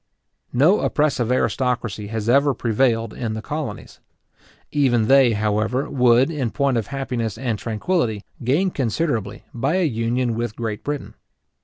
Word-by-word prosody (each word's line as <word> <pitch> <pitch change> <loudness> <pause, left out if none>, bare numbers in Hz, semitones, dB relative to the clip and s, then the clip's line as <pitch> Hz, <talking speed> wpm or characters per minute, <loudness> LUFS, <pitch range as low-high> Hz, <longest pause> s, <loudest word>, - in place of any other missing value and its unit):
No 155 +11 +4
oppressive 140 -6 +1
aristocracy 115 -3 -1
has 110 0 -4
ever 140 +2 +4
prevailed 115 -1 +1
in 110 -3 -3
the 110 - -4
colonies. 150 0 -6 0.7
Even 125 -6 +2
they, 135 -3 +5
however, 110 +5 0
would, 125 +2 +4
in 135 -7 -2
point 140 +2 0
of 110 - -2
happiness 125 -6 -3
and 120 -5 -2
tranquillity, 115 - -1 0.2
gain 155 +10 +2
considerably 120 - -2
by 135 +7 0
a 185 -2 +2
union 120 -1 0
with 115 -1 -3
Great 110 -3 -4
Britain. 145 -1 -4
120 Hz, 140 wpm, -22 LUFS, 110-140 Hz, 0.7 s, they